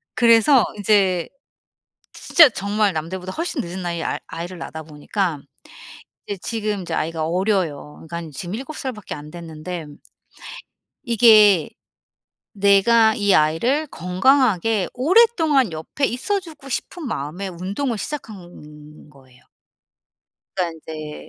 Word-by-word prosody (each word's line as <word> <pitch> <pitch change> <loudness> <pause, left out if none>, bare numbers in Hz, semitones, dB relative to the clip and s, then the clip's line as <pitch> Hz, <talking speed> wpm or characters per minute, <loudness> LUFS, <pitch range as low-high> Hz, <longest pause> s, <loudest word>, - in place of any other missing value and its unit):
그래서 235 +2 +5 0.2
이제 190 -4 +2 0.8
지 - - -12
진짜 320 -4 +9
정말 205 -1 0
남들보다 180 +4 -5
훨씬 330 -3 -3
늦은 180 +2 -6
나이에 170 -2 -3
아 - - -2
아이를 170 +2 -7
낳다 160 -1 -7
보니까 155 +2 -3 0.9
이제 200 -2 -5
지금 210 -4 -3
이제 - - -5
아이가 160 0 -2
어려요. 175 -5 -1
그러니깐 170 -2 -6
지금 175 +6 -6
7 270 +6 -7
살 260 -2 -4
밖에 210 -3 -8
안됐는데 160 +2 -8 1.2
이게 215 - +5 0.8
내가 215 +3 +4
이 205 -2 +2
아이를 235 - +2
건강하게 215 +1 +1
오랫동안 315 - +3
옆에 160 - -2
있어주고 315 - -4
싶은 320 +5 -4
마음에 175 - -4
운동을 200 +8 -3
시작한 175 - -9
거예요. 130 -3 -21 1.1
그러니까 175 -3 -2
이제 155 -1 -8
195 Hz, 275 characters per minute, -21 LUFS, 165-235 Hz, 1.2 s, 진짜